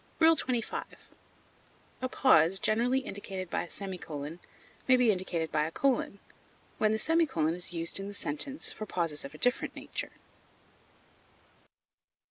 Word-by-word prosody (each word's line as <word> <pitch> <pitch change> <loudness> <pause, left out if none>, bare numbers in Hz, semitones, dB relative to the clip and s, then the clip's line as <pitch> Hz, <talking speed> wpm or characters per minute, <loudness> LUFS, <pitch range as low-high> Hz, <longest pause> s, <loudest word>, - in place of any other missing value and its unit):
XXV. 290 -8 +3 1.2
A 255 - -1
pause 190 - +5
generally 235 +5 +2
indicated 195 -5 -6
by - - +1
a - - -14
semicolon 165 -5 -5 0.5
may 255 -1 +7
be 245 -3 +5
indicated 175 -4 -2
by 150 0 +2
a 160 - -4
colon, 255 -3 +1 0.6
when 215 -1 +4
the 220 - +2
semicolon 265 - +2
is 175 0 -3
used 170 +1 -1
in 195 - -5
the 205 - -6
sentence 200 - -3
for 215 - -6
pauses 165 -6 -1
of 140 - -9
a - - -9
different 245 0 +1
nature. - - -5
195 Hz, 135 wpm, -30 LUFS, 165-250 Hz, 1.2 s, may